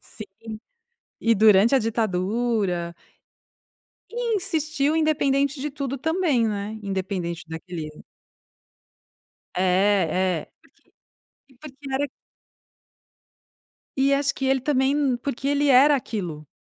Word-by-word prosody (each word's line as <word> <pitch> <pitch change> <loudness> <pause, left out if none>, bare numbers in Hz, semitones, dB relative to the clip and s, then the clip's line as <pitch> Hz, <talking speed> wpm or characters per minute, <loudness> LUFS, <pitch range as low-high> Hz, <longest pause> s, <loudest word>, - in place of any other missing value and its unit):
Sim, 215 - -9 1.0
e 230 0 +3
durante 215 +3 +5
a 270 - +6
ditadura 210 -4 -1 1.2
E 470 -1 -1
insistiu 310 -4 0
independente 280 -3 +1
de 295 +1 -3
tudo 275 -1 -4
também, 320 -6 +1
né. 210 +1 -4
Independente 185 -3 -3
daquele 160 -1 -7 1.7
É, - - 0 0.9
é - - -38 0.9
porque 275 - -25
e - - -23
porque 275 -1 -8
era 285 +2 0 1.9
E 275 +1 +3
acho 280 0 0
que 270 - -4
ele 265 -1 +2
também 265 0 +1
n 280 -4 +1
porque 275 +1 -3
ele 285 0 +2
era 275 +3 +6
aquilo. 175 - -5
265 Hz, 110 wpm, -24 LUFS, 205-285 Hz, 1.9 s, a